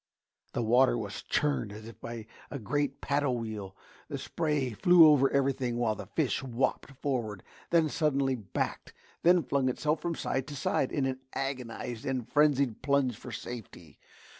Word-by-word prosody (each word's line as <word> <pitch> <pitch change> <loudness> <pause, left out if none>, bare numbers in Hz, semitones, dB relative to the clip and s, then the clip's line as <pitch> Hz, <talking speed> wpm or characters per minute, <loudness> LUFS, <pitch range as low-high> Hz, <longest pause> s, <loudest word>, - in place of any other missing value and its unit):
The 120 - 0
water 120 +2 +4
was 105 -3 -5
churned 145 -8 0
as 110 +1 -9
if 115 -1 -12
by 115 -1 -6 0.2
a 140 - -4
great 140 +3 -1
paddle 140 -3 +1
wheel; 105 -4 -5 0.3
the - - -4
spray 150 -6 -1
flew 170 - +7
over 140 -3 +6
everything 135 -3 0
while 120 -2 +1
the - - -8
fish - - 0
whopped 130 0 -1
forward, 115 -8 -2 0.3
then 165 -2 +4
suddenly 140 -4 +1
backed, 110 -7 -3 0.3
then 175 0 +5
flung 135 -2 +1
itself 150 +4 0
from 170 -1 -2
side 135 -3 -2
to 145 - -6
side 135 -1 0
in 140 -3 0
an 130 -1 -2
agonised 125 -3 -4
and 130 -3 -2
frenzied 140 -6 +2
plunge 140 -3 +2
for - - -9
safety. 95 - -8
130 Hz, 165 wpm, -30 LUFS, 115-145 Hz, 0.3 s, flew